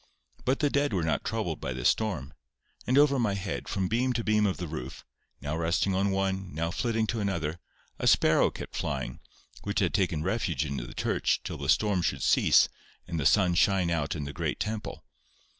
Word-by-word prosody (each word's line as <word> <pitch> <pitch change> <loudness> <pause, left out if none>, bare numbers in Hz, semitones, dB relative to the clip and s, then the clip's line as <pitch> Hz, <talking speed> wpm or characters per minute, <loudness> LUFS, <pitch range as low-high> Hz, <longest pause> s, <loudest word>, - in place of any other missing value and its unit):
But 130 +3 +1
the 145 -2 +2
dead 140 -3 +1
were 90 -4 0
not 80 -1 0
troubled - - -3
by 65 - -3
the 65 -1 -5
storm; 110 -7 0 0.5
and 130 - +3
over 145 -2 +5
my 105 -5 +1
head, 95 0 -4
from 95 -2 -1
beam 125 +5 +1
to 115 -1 -2
beam 105 -1 +3
of 95 - -1
the 90 - -4
roof, 75 -4 -7 0.4
now 75 +3 -3
resting 85 +4 +1
on 95 +2 +1
one, 95 -2 -2
now 85 +1 -1
flitting 115 +2 0
to 115 +1 -2
another, 85 -5 -2 0.4
a - - 0
sparrow - - +5
kept - - -8
flying, - - -3 0.4
which 100 0 -1
had 90 -7 +1
taken 85 -5 0
refuge 90 - -1
in 70 -1 -4
the - - -7
church - - 0
till - - -6
the - - -4
storm 105 -4 +3
should - - -1
cease - - +5 0.4
and 85 -2 -3
the 70 - +3
sun 90 -4 +4
shine 90 0 +3
out 75 -3 -1
in 75 - -4
the 70 0 -6
great 80 -2 -2
temple. 110 0 -4
95 Hz, 205 wpm, -28 LUFS, 80-110 Hz, 0.5 s, over